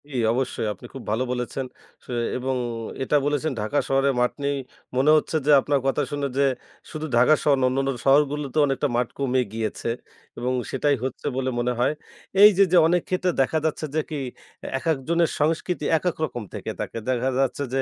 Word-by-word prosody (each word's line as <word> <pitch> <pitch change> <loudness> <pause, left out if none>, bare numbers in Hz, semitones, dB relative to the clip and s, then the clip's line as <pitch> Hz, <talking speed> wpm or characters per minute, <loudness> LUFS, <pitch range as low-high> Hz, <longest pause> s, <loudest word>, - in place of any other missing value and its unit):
জি, - - -11 0.2
অবশ্যই 125 -3 -1
আপনি 95 - -14
খুব 135 - -8
ভালো 115 +4 +1
বলেছেন 125 +2 -3 0.4
সু - - -9 0.3
এবং 130 +1 -2 0.5
এটা 140 - 0
বলেছেন 150 +1 0
ঢাকা 110 +7 -1
শহরে 135 +1 +2
মাঠ 125 - +2
নেই 140 0 +1 0.4
মনে 140 +4 +5
হচ্ছে 155 +1 0
যে, 150 - +4
আপনার 145 +1 +1
কথা 135 +2 +1
শুনে 145 -1 -1
যে, 140 - +4 0.5
শুধু 155 0 -4
ঢাকা 125 +6 +6
শহর 145 - +4
না - - +4
অন্যান্য 135 +1 0
শহরগুলোতে 145 +1 +2
অনেকটা 135 +1 0
মাঠ 120 0 +1
কমে 130 -2 +1
গিয়েছে 110 +1 -3 0.5
এবং 125 +1 -1 0.2
সেটাই 145 +2 +2
হচ্ছে 130 +2 -4
বলে 130 0 0
মনে 125 +1 0
হয়। 125 +4 +2 0.5
এইযে, 200 -2 +8
যে, 180 - +6
অনেক 175 +1 +2
ক্ষেত্রে 185 0 +1
দেখা 135 +4 +1
যাচ্ছে 155 0 -1
যে, 155 - +3
কি 155 -2 -3 0.6
একেক 160 +2 0
জনের 170 0 +2
সংস্কৃতি 160 +1 0
একেক 180 +1 -1
রকম 120 -5 -6
থেকে - - -5
থাকে - - -4
দেখা 130 +1 +1
যাচ্ছে 135 +1 0
যে, 135 - +2
140 Hz, 185 wpm, -24 LUFS, 130-150 Hz, 0.6 s, এইযে